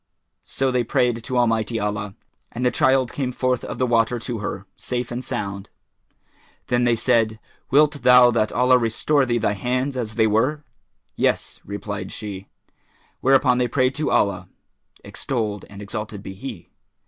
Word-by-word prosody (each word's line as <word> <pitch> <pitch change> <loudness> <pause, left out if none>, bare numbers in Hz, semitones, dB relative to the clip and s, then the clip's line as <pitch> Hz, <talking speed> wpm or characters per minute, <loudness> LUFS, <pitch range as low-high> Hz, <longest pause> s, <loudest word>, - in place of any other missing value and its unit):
So 135 -1 -1
they 125 -1 +1
prayed 115 0 0
to 130 +1 -3
Almighty 115 -1 +1
Allah, 105 -1 -3 0.4
and 125 +2 -3
the 125 - +3
child 130 0 +2
came 130 -3 -2
forth 125 -1 -1
of - - -6
the 130 - +1
water 120 0 +2
to 115 0 -5
her, 100 -1 -5
safe 125 -1 -4
and 120 +2 -4
sound. 100 -4 -4 1.0
Then 120 0 +2
said 115 -2 +3
they, 110 0 -13 0.3
"Wilt 145 +1 +3
thou 125 -1 +7
that 110 -2 +1
Allah 125 0 +4
restore 130 +5 +1
thee 120 -1 +1
thy 105 - +1
hands 125 +6 -1
as 110 -4 -4
they 110 -1 +3
were?" 130 +8 +1 0.5
"Yes," - - 0
replied 100 +1 -6
she: 100 -2 -7 0.7
whereupon 130 -1 +3
they 125 - +2
prayed 130 +2 +1
to 150 +2 -2
Allah 100 - +1 0.5
(extolled 110 -6 -3
and 100 0 -9
exalted 105 0 -6
be 95 - -7
He!) 115 +4 -8
120 Hz, 160 wpm, -22 LUFS, 110-125 Hz, 1.0 s, thou